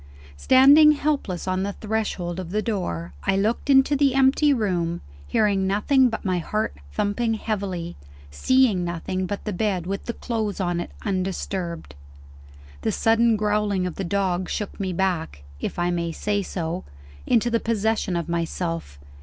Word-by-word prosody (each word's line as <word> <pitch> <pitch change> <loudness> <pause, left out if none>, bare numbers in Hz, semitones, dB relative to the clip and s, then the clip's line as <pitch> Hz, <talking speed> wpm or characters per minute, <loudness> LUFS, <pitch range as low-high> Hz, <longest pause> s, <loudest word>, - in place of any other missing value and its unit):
Standing 280 - +7
helpless 285 - -2
on 185 0 0
the 200 +1 -2
threshold 205 -5 -3
of 180 -3 -6
the 210 +3 -1
door, 85 - -3
I 195 - +2
looked 220 +8 0
into 270 +1 +5
the 275 -2 +2
empty 270 +2 +4
room; 175 -9 0 0.3
hearing 195 - +2
nothing 250 +7 +3
but 225 - -5
my 185 -2 +1
heart 210 - -2 0.2
thumping 220 - 0
heavily, 190 -6 -3 0.4
seeing 230 - +3
nothing 180 +2 -3
but 200 +2 -5
the 210 - -2
bed 185 -2 -1
with 195 +2 -4
the 235 - -2
clothes 220 -5 -3
on 175 -2 0
it 175 - -4 0.2
undisturbed. 185 - -3 0.9
The - - 0
sudden 225 0 +3
growling 210 -2 0
of 180 - -3
the 195 - -4
dog 185 -1 -1
shook 210 - -4
me 190 -2 -2
back 170 - -2 0.2
(if - - -4
I 175 0 +1
may 170 -1 -1
say 205 +5 -1
so) 175 -1 -4 0.4
into 235 +1 +2
the 230 - +2
possession 220 -4 0
of 170 -2 -2
myself. 165 - -3
195 Hz, 160 wpm, -24 LUFS, 175-225 Hz, 0.9 s, Standing